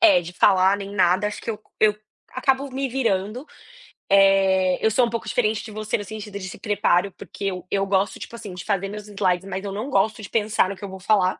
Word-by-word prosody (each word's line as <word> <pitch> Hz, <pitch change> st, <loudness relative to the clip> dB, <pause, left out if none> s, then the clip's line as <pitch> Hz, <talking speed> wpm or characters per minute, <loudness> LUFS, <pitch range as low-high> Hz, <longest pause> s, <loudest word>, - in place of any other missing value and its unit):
eh, 320 Hz, -, +7 dB
de 175 Hz, +1 st, -8 dB
falar 190 Hz, +2 st, +4 dB
nem 200 Hz, 0 st, -7 dB
nada, 190 Hz, +1 st, +3 dB
acho 210 Hz, -, -4 dB
que -, -, -3 dB
eu 215 Hz, -2 st, -6 dB, 0.2 s
eu 215 Hz, -1 st, +5 dB, 0.4 s
acabo 270 Hz, +1 st, +1 dB
me 270 Hz, +1 st, -2 dB
virando. 230 Hz, -1 st, -1 dB, 0.7 s
Eh, 195 Hz, -2 st, +4 dB
eu 220 Hz, -, +6 dB
sou 240 Hz, +3 st, +4 dB
um -, -, -3 dB
pouco 230 Hz, 0 st, -4 dB
diferente 220 Hz, -2 st, 0 dB
de 220 Hz, -, -9 dB
você 215 Hz, 0 st, -2 dB
no 205 Hz, -, -5 dB
sentido 210 Hz, -2 st, -7 dB
de 185 Hz, -, -6 dB
se -, -, -9 dB
preparo, 200 Hz, -2 st, +1 dB
porque 200 Hz, -, -8 dB
eu 185 Hz, -2 st, -3 dB
eu 195 Hz, 0 st, +1 dB
gosto 195 Hz, 0 st, 0 dB
tipo -, -, -8 dB
assim 210 Hz, -5 st, -8 dB
de 180 Hz, -, -7 dB
fazer 195 Hz, -2 st, -1 dB
meus 210 Hz, +1 st, -8 dB
slides 195 Hz, -3 st, 0 dB
mas 190 Hz, +1 st, -4 dB
eu 200 Hz, -, -3 dB
não 215 Hz, +7 st, -4 dB
gosto 215 Hz, -2 st, +1 dB
de 205 Hz, -, -8 dB
pensar 215 Hz, -3 st, +1 dB
no 200 Hz, -, -4 dB
que 185 Hz, -, -15 dB
eu -, -, -7 dB
vou 190 Hz, 0 st, -9 dB
falar. 190 Hz, -1 st, +2 dB
200 Hz, 240 wpm, -23 LUFS, 190-220 Hz, 0.7 s, eh